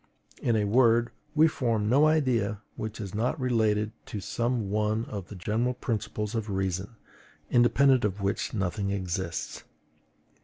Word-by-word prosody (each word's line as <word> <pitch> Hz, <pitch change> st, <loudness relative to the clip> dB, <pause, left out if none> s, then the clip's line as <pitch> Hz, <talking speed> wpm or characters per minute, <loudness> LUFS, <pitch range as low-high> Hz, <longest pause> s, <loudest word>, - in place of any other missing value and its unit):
in 120 Hz, -, +2 dB
a 105 Hz, -1 st, +2 dB
word, 120 Hz, +1 st, +4 dB, 0.2 s
we 155 Hz, +1 st, +6 dB
form 115 Hz, -8 st, 0 dB
no 140 Hz, +7 st, +5 dB
idea 125 Hz, -10 st, +1 dB, 0.2 s
which 110 Hz, 0 st, -5 dB
is 100 Hz, -3 st, -6 dB
not 120 Hz, +8 st, -1 dB
related 110 Hz, -4 st, +1 dB, 0.2 s
to 105 Hz, -, -5 dB
some 115 Hz, 0 st, -1 dB
one 110 Hz, +2 st, 0 dB
of 100 Hz, -4 st, -6 dB
the 105 Hz, -, -9 dB
general 110 Hz, +7 st, -1 dB
principles 105 Hz, -2 st, -3 dB
of 110 Hz, -2 st, -2 dB
reason, 95 Hz, +2 st, -2 dB, 0.6 s
independent 130 Hz, +2 st, +4 dB
of 105 Hz, -1 st, -1 dB
which 100 Hz, 0 st, -1 dB
nothing 100 Hz, -1 st, -2 dB
exists. 95 Hz, -3 st, -3 dB
110 Hz, 145 wpm, -28 LUFS, 100-120 Hz, 0.6 s, we